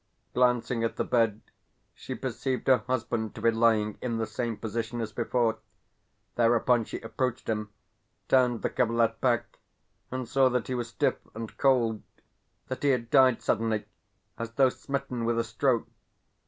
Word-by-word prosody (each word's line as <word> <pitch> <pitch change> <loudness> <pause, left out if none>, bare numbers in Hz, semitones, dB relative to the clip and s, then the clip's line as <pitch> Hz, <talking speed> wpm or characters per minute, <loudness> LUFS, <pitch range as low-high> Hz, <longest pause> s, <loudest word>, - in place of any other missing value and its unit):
Glancing 125 -1 +2
at 115 - -1
the - - 0
bed, 115 -3 +1 0.5
she - - -7
perceived 130 -1 -3
her 130 -1 +5
husband 120 -3 -2
to - - -8
be 115 - +5
lying 110 -2 +2
in 120 -2 -2
the 115 - 0
same 115 +1 -3
position 115 +2 -3
as 110 -2 -3
before. 115 -1 0 0.7
Thereupon 120 0 +3
she - - -6
approached 125 +2 -3
him, 105 -1 -2 0.6
turned 125 -3 +3
the - - 0
coverlet 115 -2 +1
back, 120 -3 0 0.5
and 130 -1 -4
saw 135 +1 +4
that 125 -2 0
he 130 - -3
was 120 -2 -2
stiff 120 - 0 0.2
and 115 0 -6
cold 120 -6 +2 0.7
that 130 - -5
he 145 - +2
had 120 -3 0
died 130 -3 +5
suddenly, 110 -1 0 0.5
as 115 0 -5
though 135 +1 +5
smitten 135 -2 -4
with 115 0 +1
a 115 - +2
stroke. 115 +2 0
115 Hz, 160 wpm, -28 LUFS, 115-125 Hz, 0.7 s, her